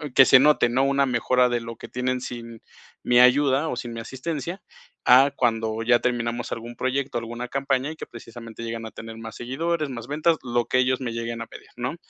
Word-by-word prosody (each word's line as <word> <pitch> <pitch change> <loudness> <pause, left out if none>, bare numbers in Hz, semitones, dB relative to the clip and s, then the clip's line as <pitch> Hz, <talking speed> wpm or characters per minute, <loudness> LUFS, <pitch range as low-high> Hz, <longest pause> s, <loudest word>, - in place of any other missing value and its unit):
que 135 - +8
se 130 - +7
note, 150 -3 +4
¿no?, 130 +3 +2
una 140 0 +2
mejora 125 0 +2
de 120 0 0
lo 115 0 -7
que - - -9
tienen 125 0 -2
sin 115 -2 -8 0.4
mi 120 0 +4
ayuda, 135 +4 +4
o - - -2
sin 120 -1 -6
mi 115 - -6
asistencia, 155 - -5 0.4
a 135 +3 +7
cuando 115 -3 0
ya 120 +1 +4
terminamos 120 -1 -2
algún 120 +1 -6
proyecto, 130 +1 -2
alguna 120 +1 -5
campaña, 135 +1 -1
y - - -8
que - - -8
precisamente 115 -1 -11
llegan 115 0 -5
a 110 - -8
tener 115 0 -9
más 115 0 -8
seguidores, 155 +5 -2
más 120 -3 -7
ventas, 155 +3 +1
lo 120 -1 0
que - - 0
ellos 130 0 +2
me 125 -2 -3
lleguen 115 0 -4
a 115 - -6
pedir, - - -13
¿no? 125 +5 -3
125 Hz, 215 wpm, -24 LUFS, 115-135 Hz, 0.4 s, que